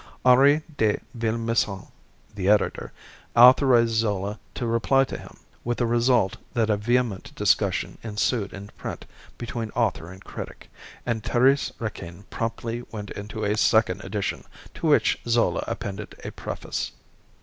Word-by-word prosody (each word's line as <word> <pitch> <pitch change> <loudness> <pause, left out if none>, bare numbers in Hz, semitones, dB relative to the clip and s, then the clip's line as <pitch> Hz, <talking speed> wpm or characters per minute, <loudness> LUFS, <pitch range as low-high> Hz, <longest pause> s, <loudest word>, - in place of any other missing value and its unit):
Henri 140 +4 +6
de 110 -2 +2 0.2
Villemessant, 115 -3 -1 0.4
the 100 -2 -1
Editor, 105 0 +2 0.4
authorised 125 -1 +7
Zola 105 -2 -1 0.2
to 120 - -3
reply 115 +4 +3
to - - -5
him, - - -10 0.3
with 120 0 -1
the 120 - +1
result 120 -3 +2 0.2
that 110 -2 +2
a - - +3
vehement 120 -1 0
discussion - - +1
ensued 105 -1 -1
in 100 +1 -9
print - - -6 0.3
between 120 -2 -4
author 85 +2 0
and 95 0 -13
critic, - - -9 0.3
and 115 -2 -1
"Thérèse 130 +5 +3
Raquin" 100 -4 -6
promptly 115 +1 -3
went 105 -2 -6
into 105 +2 -6
a 105 +1 +1
second 110 -3 +2
edition, 100 +1 -3 0.3
to - - -3
which - - +3
Zola 120 0 +2
appended 100 +1 -5
a - - -4
preface. - - -5
115 Hz, 140 wpm, -25 LUFS, 105-120 Hz, 0.4 s, authorised